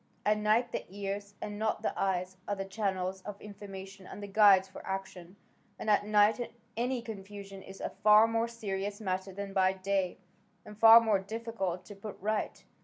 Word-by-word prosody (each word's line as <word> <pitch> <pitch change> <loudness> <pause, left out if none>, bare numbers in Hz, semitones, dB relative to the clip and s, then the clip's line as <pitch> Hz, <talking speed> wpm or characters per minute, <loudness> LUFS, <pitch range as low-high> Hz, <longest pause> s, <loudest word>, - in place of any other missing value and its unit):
At 210 0 +3
night 220 +3 +2
the - - -3
ears, 200 +1 -5
and 210 0 -5
not 220 0 -1
the - - 0
eyes, 185 -1 -1
are 205 - -1
the 195 0 -4
channels 190 -2 -2
of 205 +1 -8
information 195 -2 -10
and 205 - -9
the - - -3
guides 200 -2 +6
for 190 - -11
action, 190 -2 -6 0.4
and 215 - -1
at 205 0 +3
night 215 +3 +3 0.2
any 245 +1 -1
confusion 200 -2 -8
is 195 0 -11
a - - -4
far 210 +1 +8
more 225 0 0
serious 205 -3 -4
matter 190 -2 -3
than 200 +1 -6
by 190 -1 +3
day, 190 -1 -1 0.5
and 210 - -10
far 225 +2 +9
more 215 -4 +2
difficult 200 -3 -4
to 205 - -10
put 200 +1 -8
right. 215 +2 -2
200 Hz, 180 wpm, -31 LUFS, 190-215 Hz, 0.5 s, far